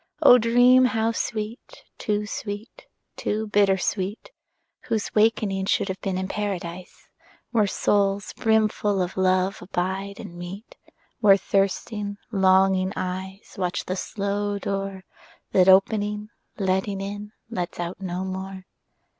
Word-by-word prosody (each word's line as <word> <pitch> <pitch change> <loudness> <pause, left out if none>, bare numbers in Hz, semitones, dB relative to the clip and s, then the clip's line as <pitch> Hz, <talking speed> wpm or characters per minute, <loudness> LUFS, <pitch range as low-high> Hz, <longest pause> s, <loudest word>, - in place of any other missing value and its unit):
O 250 -3 +9
dream 245 +3 +5
how 225 -2 +1
sweet, 230 - -5 0.2
too 210 0 -1
sweet, 205 +1 -7 0.3
too 215 +1 -2
bitter 200 -2 +3
sweet, 195 - -3 0.5
Whose 220 -2 -2
wakening 210 -3 +2
should 195 - +1
have 190 0 -4
been 190 -2 -2
in 190 0 -2
Paradise, 185 -4 -5 0.4
Where 215 -4 +3
souls 200 0 +1
brimful 215 -2 +1
of 180 0 -2
love 185 0 +1
abide 190 +2 -3
and - - -8
meet; 175 +5 -9 0.4
Where 200 -4 +6
thirsting 200 +2 -1
longing 190 -1 +3
eyes 190 +2 -5
Watch 180 -1 -1
the 185 - -2
slow 200 +1 -2
door 195 -1 -3 0.5
That 185 0 +5
opening, 210 +2 +3 0.3
letting 190 0 0
in, 205 +2 -6 0.2
lets 180 -6 -4
out 175 +2 -4
no 185 0 -3
more. 190 0 -6
195 Hz, 125 wpm, -24 LUFS, 190-210 Hz, 0.5 s, O